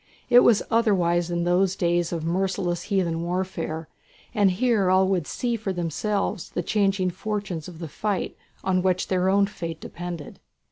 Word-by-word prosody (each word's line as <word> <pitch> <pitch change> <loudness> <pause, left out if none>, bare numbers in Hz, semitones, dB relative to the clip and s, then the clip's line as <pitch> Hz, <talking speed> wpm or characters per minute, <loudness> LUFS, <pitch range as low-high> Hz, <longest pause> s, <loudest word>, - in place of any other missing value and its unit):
It 245 - +9
was 235 -4 +5
otherwise 180 -7 +2
in 170 0 -1
those 180 +2 +2
days 175 -2 +1
of 165 -2 -3
merciless 180 0 0
heathen 175 -5 +1
warfare, 170 -3 -3 0.5
and 205 -4 +4
here 205 0 +2
all 185 0 +4
would 180 -5 0
see 240 -1 -1
for 215 -3 -3
themselves 185 +2 -2
the 175 - -3
changing 195 -2 +1
fortunes 195 -4 -4
of 175 -3 -10
the 165 0 -6
fight 200 +5 -2 0.3
on 185 -1 +2
which 185 0 0
their 185 0 +2
own 200 +1 +4
fate 170 -5 -6
depended. 170 -4 -7
185 Hz, 160 wpm, -25 LUFS, 175-200 Hz, 0.5 s, It